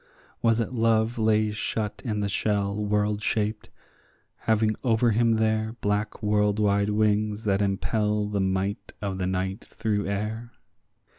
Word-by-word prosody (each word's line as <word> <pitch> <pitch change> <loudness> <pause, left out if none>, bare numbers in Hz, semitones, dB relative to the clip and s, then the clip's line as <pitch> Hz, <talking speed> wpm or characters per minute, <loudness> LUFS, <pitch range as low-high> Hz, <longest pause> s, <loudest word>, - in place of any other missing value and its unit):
Was 115 0 +3
it 115 +2 -2
Love 115 0 +2
lay 110 -1 +2
shut 105 0 -3
in 105 -5 -2
the 100 - 0
shell 100 0 0
world 105 0 0
shaped, 110 0 -1 0.7
having 110 -1 +1
over 115 -1 +3
him 115 +1 +3
there 110 0 0
Black 105 +2 -2
world 105 0 +2
wide 100 -1 +2
wings 105 0 +1
that 100 -2 +1
impel 105 +1 0
the 105 -1 -1
might 95 +3 -2
of 95 -2 -3
the 90 - 0
night 95 +3 -2
through 105 -2 -2
air? 110 +4 -3
105 Hz, 145 wpm, -26 LUFS, 100-110 Hz, 0.7 s, Was